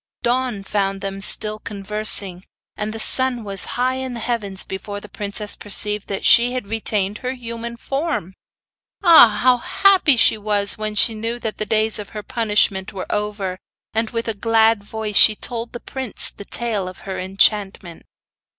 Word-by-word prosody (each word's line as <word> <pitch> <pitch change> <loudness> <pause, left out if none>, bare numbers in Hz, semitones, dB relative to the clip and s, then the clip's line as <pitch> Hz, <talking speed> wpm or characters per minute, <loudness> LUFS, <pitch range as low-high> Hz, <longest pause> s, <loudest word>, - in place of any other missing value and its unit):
Dawn 245 -4 -1
found 195 -1 -2
them 195 0 -5
still 215 +1 +1
conversing; 200 -3 0 0.3
and 210 0 -4
the 225 - -7
sun 255 0 +2
was 195 -2 -3
high 255 +1 0
in 260 -2 -5
the - - -5
heavens 215 -5 -3
before 205 +1 -6
the 210 - -12
princess 205 +1 -3
perceived 210 0 0
that 195 - -4
she 245 +2 +5
retained 210 -2 -2
her 255 0 -4
human 235 -1 -7
form. 275 - -3 0.7
Ah! 330 - +8
how 250 -1 +5
happy 370 0 +3
she 220 - +5
was 205 -1 -1
when 215 0 -4
she 225 +2 +3
knew 225 +2 -4
that 225 -3 -6
the 215 - -3
days 220 +1 +4
of 205 - -8
her 210 - -6
punishment 210 -5 0
were 190 -2 -6
over; 205 -3 -3 0.3
and 225 0 -1
with 230 -1 -4
a 225 - -1
glad 225 0 +2
voice 215 0 -5
she 215 - +7
told 230 +1 -5
the 240 - -7
prince 260 -1 -4
the 200 - -10
tale 215 -6 -1
of 185 - -13
her 190 -1 -6
enchantment. 190 -2 0
215 Hz, 170 wpm, -20 LUFS, 200-235 Hz, 0.7 s, Ah